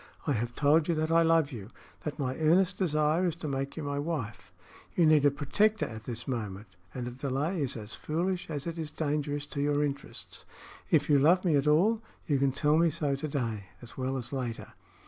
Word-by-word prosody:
I 145 - +1
have 120 +1 -2
told 150 +2 +4
you 170 - +1
that 155 +1 0
I 165 0 +5
love 165 -3 +3
you, 105 -6 -7 0.4
that 150 - -3
my 130 -3 -2
earnest 180 +4 +3
desire 155 -1 +2
is 165 - -1
to 165 -2 -6
make 135 +1 -3
you 160 - -3
my 145 0 -2
wife. 115 - -4 0.4
You 170 - +4
need 155 -2 +5
a - - +6
protector 205 +10 +1
at 110 -1 -8
this 120 -1 -5
moment, 105 -5 -4 0.3
and 125 -1 -5
a - - -4
delay 140 +7 -2
is 135 -4 -1
as 105 0 -8
foolish 175 +4 -2
as 145 -3 -3
it 170 -1 -4
is 155 -2 -3
dangerous 145 -1 -2
to 140 - -1
your 145 0 +2
interests. 140 -1 -5 0.5
If 150 -2 +3
you 145 -2 +5
love 175 +7 +4
me 165 -4 +3
at 140 +1 +2
all, 200 +10 +4 0.2
you 145 -3 +1
can 135 0 +3
tell 150 +3 +2
me 170 0 +4
so 145 -3 -1
to 140 +3 -4
day 115 -8 -3
as 120 - -11
well 130 +1 -2
as 125 +1 -6
later." 125 -4 -4
145 Hz, 220 wpm, -30 LUFS, 130-160 Hz, 0.5 s, a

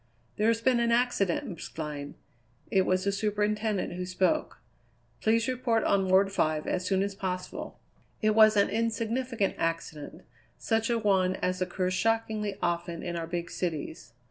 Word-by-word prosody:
"There's 225 +2 +2
been 250 0 +3
an 235 0 +2
accident, 245 +1 +1
Miss 175 -7 -6
Glynn." 150 -2 -6 0.6
It 190 -1 +3
was 185 0 +2
the 200 - +1
superintendent 210 0 -1
who 180 +1 -4
spoke. 185 -1 0 0.6
"Please 225 +1 +2
report 245 -3 +1
on 195 -1 +2
Ward 195 +1 +4
Five 155 -5 0
as 185 - -1
soon 190 0 +2
as 200 0 -3
possible." 185 -2 -5 0.4
It 215 -1 +2
was 215 -1 +6
an 200 - +5
insignificant 230 0 -1
accident; 165 -3 -3 0.3
such 225 0 0
a 235 - +2
one 190 -4 +2
as 185 0 -2
occurs 185 0 -1
shockingly 215 0 0
often 170 -1 -2
in 175 -1 -3
our 165 -1 -3
big 170 0 -4
cities. 155 -9 -4
195 Hz, 155 wpm, -29 LUFS, 180-225 Hz, 0.6 s, was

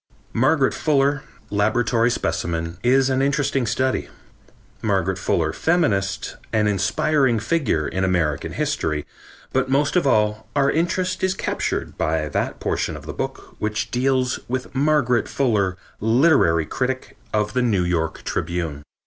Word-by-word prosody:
Margaret 135 +3 +3
Fuller, 140 -2 +2 0.3
laboratory 115 +3 +2
specimen, 85 -3 -2
is 130 +2 +4
an 130 0 +1
interesting 140 -2 +1
study; 130 +4 0 0.7
Margaret 95 -3 0
Fuller, 80 -4 0
feminist, 100 - 0
an 110 -1 +2
inspiring 120 - +2
figure 110 - 0
in 95 - -2
American 85 -6 0
history; 75 -2 -1 0.5
but 130 0 +1
most 140 +3 +2
of 175 -5 +3
all 105 -3 +1
our 140 -1 +3
interest 180 +3 0
is 190 0 +2
captured - - -3
by 80 -1 0
that - - -2
portion - - -2
of - - -12
the - - -5
book - - -6
which 105 +1 -2
deals 130 0 +1
with 130 +1 -4
Margaret 135 -4 +2
Fuller, 105 -9 +1 0.2
literary 110 - +4
critic 130 +9 -3 0.2
of 105 -1 0
The 125 - +1
New 105 -7 +2
York 85 -2 -1
Tribune. 80 -4 -3
115 Hz, 135 wpm, -22 LUFS, 95-135 Hz, 0.7 s, is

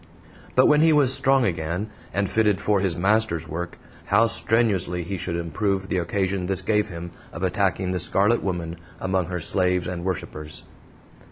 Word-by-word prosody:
But 130 - +6
when 150 0 +5
he 160 0 +5
was 145 -4 +4
strong 135 -1 +4
again, 85 +3 -2 0.2
and 100 0 0
fitted 105 -1 +2
for 105 0 +1
his 95 -3 -1
Master's 95 -4 +1
work, 85 +2 -5 0.3
how 105 +3 +4
strenuously 105 -6 +1
he 95 +4 -4
should 85 -1 -3
improve 95 +4 -2
the 95 - +1
occasion 95 +1 -1
this 95 -2 -2
gave 105 -1 +1
him 85 -1 -7 0.2
of 85 - -7
attacking 95 -1 0
the 90 - -1
Scarlet 100 +6 +3
Woman 85 -3 -3 0.2
among 95 -2 -1
her 90 0 -3
slaves 90 +1 +1
and 90 -1 -4
worshipers! 75 -4 -5
95 Hz, 170 wpm, -24 LUFS, 85-105 Hz, 0.3 s, But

